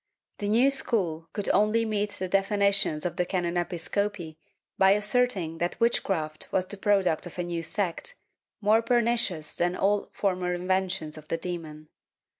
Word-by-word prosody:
^ -, -, -47 dB
The 205 Hz, -, -2 dB
new 245 Hz, +6 st, +4 dB
school 185 Hz, -12 st, -1 dB
could 205 Hz, -, -2 dB
only 215 Hz, +2 st, +3 dB
meet 210 Hz, -1 st, 0 dB
the 185 Hz, -, -4 dB
defi 195 Hz, +2 st, +1 dB
nitions 200 Hz, -6 st, +2 dB
of 175 Hz, -, -2 dB
the 180 Hz, -, +2 dB
can. 185 Hz, -2 st, -1 dB
Episcopi 175 Hz, 0 st, -2 dB, 0.4 s
by 190 Hz, 0 st, +5 dB
asserting 210 Hz, -6 st, +1 dB
that 175 Hz, +5 st, -2 dB
witchcraft 170 Hz, -9 st, 0 dB
was 185 Hz, -, +1 dB
the 205 Hz, -, -5 dB
product 195 Hz, -5 st, +1 dB
of 175 Hz, -, -12 dB
a 175 Hz, -, -1 dB
new 170 Hz, -1 st, -3 dB
sect, 180 Hz, -, -3 dB, 0.5 s
more 215 Hz, +2 st, +4 dB
pernicious 230 Hz, -9 st, +1 dB
than 175 Hz, +1 st, 0 dB
all 200 Hz, +2 st, +1 dB
former 180 Hz, -2 st, -1 dB
inventions 180 Hz, -3 st, -1 dB
of 155 Hz, -, -16 dB
the 165 Hz, -, -1 dB
demon. 160 Hz, -3 st, -6 dB
190 Hz, 165 wpm, -27 LUFS, 170-210 Hz, 0.5 s, by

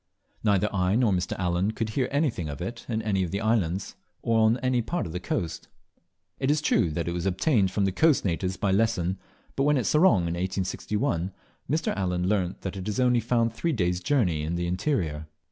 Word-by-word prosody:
Neither 105 Hz, -2 st, +3 dB
I 95 Hz, 0 st, +1 dB
nor 120 Hz, -3 st, +3 dB
Mr. 90 Hz, -1 st, -1 dB
Allen 90 Hz, +3 st, 0 dB
could 110 Hz, -1 st, -2 dB
hear 125 Hz, +4 st, -1 dB
anything 135 Hz, -, 0 dB
of 70 Hz, -, -6 dB
it 95 Hz, +7 st, -6 dB
in 110 Hz, -1 st, -1 dB
any 100 Hz, -3 st, +1 dB
of 90 Hz, -, -1 dB
the 100 Hz, -, -2 dB
islands 100 Hz, -5 st, 0 dB, 0.3 s
or 115 Hz, -1 st, +2 dB
on 110 Hz, +2 st, +4 dB
any 125 Hz, -1 st, +2 dB
part 175 Hz, +10 st, -2 dB
of 85 Hz, -, -6 dB
the 90 Hz, -, -3 dB
coast. 85 Hz, -2 st, -3 dB, 0.7 s
It 135 Hz, -, 0 dB
is 150 Hz, +1 st, +3 dB
true 140 Hz, -, +2 dB
that 85 Hz, +2 st, -3 dB
it -, -, 0 dB
was 85 Hz, +2 st, -2 dB
obtained 95 Hz, -, +2 dB
from 100 Hz, +1 st, 0 dB
the 95 Hz, -, +1 dB
coast 155 Hz, -, +3 dB
natives 90 Hz, +1 st, -1 dB
by 100 Hz, -, 0 dB
Lesson; 95 Hz, -3 st, +1 dB, 0.4 s
but -, -, -1 dB
when 145 Hz, +1 st, +3 dB
at 125 Hz, -, 0 dB
Sorong 150 Hz, -, +4 dB
in 85 Hz, -1 st, -2 dB
1861, 95 Hz, 0 st, -2 dB, 0.4 s
Mr. 155 Hz, +3 st, 0 dB
Allen 90 Hz, -2 st, -1 dB
learnt 95 Hz, -3 st, 0 dB
that 95 Hz, 0 st, -4 dB
it 95 Hz, +1 st, -6 dB
is 105 Hz, -, -2 dB
only 125 Hz, -1 st, +4 dB
found 115 Hz, 0 st, +1 dB
three 165 Hz, +8 st, -1 dB
days' 90 Hz, -6 st, 0 dB
journey 95 Hz, -, +1 dB
in 80 Hz, +3 st, -2 dB
the 85 Hz, 0 st, -1 dB
interior. 85 Hz, -, -1 dB
100 Hz, 215 wpm, -26 LUFS, 90-115 Hz, 0.7 s, on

